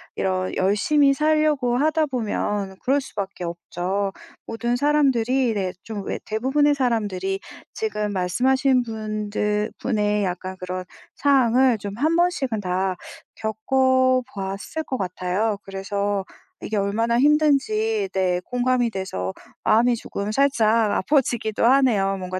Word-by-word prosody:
이런 185 -1 -1
열심히 275 +9 +3
살려고 300 -4 +2
하다 310 +3 +2
보면 205 -6 -2
그럴 275 +3 +2
수밖에 200 -7 -6
없죠. 180 +3 -3 0.3
모든 235 +1 -1
사람들이 260 -3 +2
네, 190 -2 -2
좀 220 -2 -7
왜 - - -3
대부분의 270 +7 +2
사람들이 205 -7 -1 0.3
지금 210 - -2
말씀하신 255 +8 +2
분들 215 -1 -2
분의 210 -4 0
약간 185 +1 -4
그런 185 0 -5 0.3
상황을 260 -3 +3
좀 200 +1 -6
1 315 +5 +2
번씩은 285 -11 +1
다 185 0 -1 0.4
겪어보았을 255 +1 0
것 260 -3 -3
같아요. 185 +3 -1
그래서 200 +1 -2 0.4
이게 215 - -3
얼마나 225 +4 +1
힘든지 310 - +2
네, 180 -2 +1
공감이 250 -1 +1
돼서 95 - -4 0.3
마음이 240 +2 +4
조금 210 -2 -5
살짝 230 -5 +3
아파지기도 230 -3 +1
하네요. 230 -7 +3
뭔가 185 0 -4
225 Hz, 270 characters per minute, -23 LUFS, 195-265 Hz, 0.4 s, 마음이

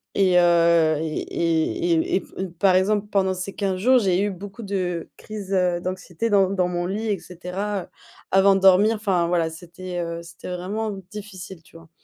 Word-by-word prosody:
et 185 -2 +4
heu 170 -2 +4
et 160 -1 -3
et 165 +1 0
et 160 - +1
et - - +1
p - - -17 0.2
et - - -3
par 180 +2 +2
exemple, 205 +2 +2
pendant 190 -2 +1
ces 185 +2 -5
15 195 -2 -1
jours, 255 +6 +5
j'ai 190 -4 +1
eu 205 - +1
beaucoup 200 +4 -9
de 180 -4 -3
crise, 210 -3 -8
heu, 180 -2 +1
d'anxiété 185 +3 -3
dans 195 -3 +4
dans 185 -2 0
mon 175 0 -2
lit 210 +4 -3
et 200 -3 0
cetera, 185 +4 -4
heu, - - -25 0.4
avant 195 +1 +5
de 195 - 0
dormir, 195 +4 +5
enfin, 190 -5 +1
voilà, 170 -2 +1
c'était, 175 +2 -8
heu, 170 0 -4
c'était 170 +1 -10
vraiment 210 +5 -3 0.2
difficile, 195 -4 -9
tu - - -23
vois? 165 -1 -17
185 Hz, 200 wpm, -23 LUFS, 175-200 Hz, 0.4 s, jours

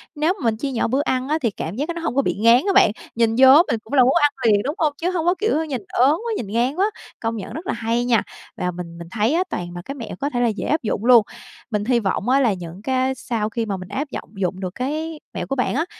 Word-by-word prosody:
nếu 310 +4 +1
mình 225 -2 +1
chia 275 +4 -3
nhỏ 240 - 0
bữa 265 +4 +1
ăn 260 -2 -1
á, 310 - +2
thì 230 -5 +1
cảm 180 -2 -5
giác 280 +5 -1
cái 340 - -3
nó 335 - -6
hông 325 -6 -2
có 275 - +4
bị - - 0
ngán 230 +3 +5
á 395 - +2
bạn. 390 - +6 0.2
Nhìn 225 -1 +2
vô 265 0 +9 0.2
mình 230 - 0
cũng 220 - -12
là 265 -3 +6
muốn 255 +2 +4
ăn 290 0 +4
liền, 205 -2 +4
đúng 290 +4 -2
hông? 305 -3 +1
Chứ 355 +3 -1
hông 335 -3 -1
có 355 +1 +3
kiểu 370 -7 +1
nhìn 265 -6 -4
ớn 255 +3 +3 0.2
quá, 470 - -2
nhìn 220 - -4
ngán 240 +7 0
quá, 400 +4 +1 0.3
công 230 0 -2
nhận 215 - -7
rất 325 +7 -7
là - - 0
hay 230 +1 -1
nha. 235 -3 +3 0.3
Và 180 0 -1
mình 170 -1 -8
mình 170 0 -9
thấy 220 +6 +1
á, 350 +3 +2
toàn 175 0 -4
là 175 - -5
cái 275 - -6
mẹo 235 -9 -7
có 285 - -1
thể 245 -4 -2
là 245 - +3
dễ 215 -2 -2
áp 310 +2 +1
dụng 215 0 -2
luôn. 240 -3 +7 0.5
Mình 210 -1 -1
hy 245 0 +3
vọng 200 +2 -1
á 265 +2 +4
là 240 -6 +3
những 175 0 -8
cái 260 +2 0
sau 220 -4 -2
khi 230 0 -2
mà 200 -3 -3
mình 185 -1 -9
áp 275 +8 -3
giọng - - -6
dụng 185 -1 -2
được 185 -1 -5
cái 310 +5 -3
mẹo - - -4
của 275 - -2
bạn 250 -2 0
á, 315 +4 +1
245 Hz, 300 wpm, -21 LUFS, 215-290 Hz, 0.5 s, vô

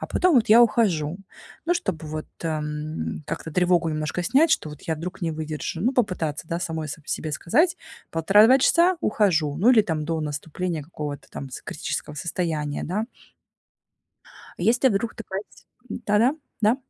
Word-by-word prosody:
а - - -4
потом 360 -3 +2
вот 235 -2 +4
я 225 +2 +8
ухожу. 180 -9 +2 0.5
Ну, 345 - +3
чтобы 175 - -3
вот, 155 0 -5 0.2
эм, 155 -1 -3
как-то 160 - -5
тревогу 180 -1 +2
немножко 155 +3 -2
снять, 300 - +4
что 305 - +1
вот 150 - -11
я 160 -1 -2
вдруг 180 +4 -6
не 165 - 0
выдержу. 155 +1 -4
Ну, 245 +6 +2
попытаться, 170 - -1
да, 170 - -1
самой 160 -3 -3
с 145 - -4
себе 155 - -3
сказать: 325 - +2 0.3
"1,5-2 205 - +5
часа- 345 +6 +4
ухожу". 175 - +2
Ну, 215 +9 +5
или 230 -4 +6
там 160 -5 -2
до 165 +1 -1
наступления 155 +3 -3
какого-то 145 -2 -7
там 140 - -7
с - - -8
критического 150 - -4
состояния, 155 -2 -2
да. 210 +6 -2 1.5
Если 245 +3 +3
вдруг 225 +1 -1
ты 225 - -8
пать 195 +2 -7 0.2
Да-да, 235 +6 +1 0.2
да. 220 +3 +4
170 Hz, 165 wpm, -24 LUFS, 155-225 Hz, 1.5 s, я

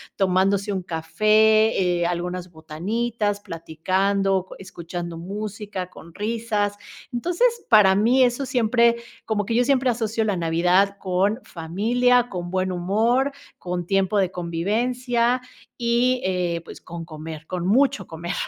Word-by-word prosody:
tomándose 195 +2 +1
un 190 - -2
café, 215 +2 +3
eh, 170 - +2
algunas 175 +1 -4
botanitas, 205 +7 -2
platicando, 190 +3 -1
escuchando 175 -2 -7
música 200 0 -5
con 170 -1 -14
risas. 210 -1 -1 0.4
Entonces 360 - 0
para 200 -3 +6
mí, 245 +6 +4
eso 245 +2 +1
siempre 235 -1 +3 0.3
como 210 -2 -1
que 230 - -2
yo 245 - +4
siempre 260 -1 +2
asocio 225 -1 -1
la 205 -2 0
Navidad 180 +4 +2
con 195 +5 0
familia, 235 +9 +1
con 175 -3 -5
buen 185 0 0
humor, 225 +10 +1 0.3
con 175 -1 -4
tiempo 195 +2 +1
de 190 -2 +2
convivencia 235 +8 0 0.4
y, 245 +1 +1
eh, 180 -2 -1
pues, - - -11
con 170 0 -8
comer 160 0 -8
con 180 -1 -3
mucho 250 -3 +2
comer. 170 +3 -5
200 Hz, 130 wpm, -23 LUFS, 175-235 Hz, 0.4 s, para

